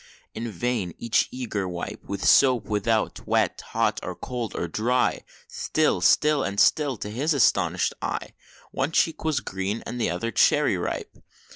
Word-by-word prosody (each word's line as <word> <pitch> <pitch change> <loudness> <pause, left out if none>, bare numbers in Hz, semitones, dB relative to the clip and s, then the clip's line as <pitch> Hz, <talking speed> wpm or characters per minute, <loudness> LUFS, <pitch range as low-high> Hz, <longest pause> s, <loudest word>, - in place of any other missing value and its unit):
In 115 +1 -4
vain 105 -4 -2
each 115 -1 +1
eager 110 -7 -3
wipe, 90 -1 -6
With 100 -1 -5
soap 125 -6 +5
without 110 +1 -1
wet - - +1
hot - - 0
or - - -5
cold 120 -4 -5
or 85 - -2
dry, 120 +8 0 0.3
Still, - - 0
still, 150 -1 +4
and 100 +1 -2
still, 145 -5 +3
to 105 - -6
his 145 +8 0
astonished 135 - +2
eye - - -4 0.4
One 135 +4 -1
cheek 165 - +1
was 155 -5 0
green, 95 +2 -3
the 120 -1 -2
other 90 +7 -2
cherry - - +3
ripe! - - -4
115 Hz, 155 wpm, -25 LUFS, 100-130 Hz, 0.4 s, soap